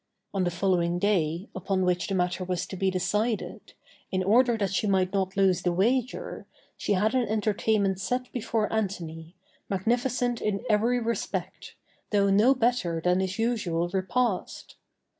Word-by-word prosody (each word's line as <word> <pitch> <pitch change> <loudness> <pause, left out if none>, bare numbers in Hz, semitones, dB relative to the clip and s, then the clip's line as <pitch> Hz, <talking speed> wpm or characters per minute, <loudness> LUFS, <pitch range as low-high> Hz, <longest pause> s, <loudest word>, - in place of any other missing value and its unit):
On 190 -2 0
the - - +2
following 175 -1 +1
day, 175 -2 0
upon 185 0 0
which 180 -1 0
the 195 - -1
matter 180 0 0
was 180 -1 -2
to - - -8
be 190 +1 +1
decided, 210 +5 -2 0.4
in 185 0 0
order 235 +4 +4
that 200 -3 -1
she 210 - 0
might 190 -1 +1
not 190 -1 -1
lose 190 -2 +3
the 180 - +1
wager, 235 +8 -1 0.3
she - - -1
had 210 +4 +2
an 255 -3 +1
entertainment 210 -2 +1
set 250 +6 -2
before 225 -3 -1
Antony, 170 -6 -3 0.3
magnificent 240 +4 0
in 210 0 -1
every 230 +3 +2
respect, 230 0 -4 0.3
though 200 -2 +3
no 220 +7 +5
better 230 -9 +1
than 180 +2 +2
his 190 0 -2
usual 200 -8 0
repast. 195 +3 -2
195 Hz, 155 wpm, -27 LUFS, 185-225 Hz, 0.4 s, no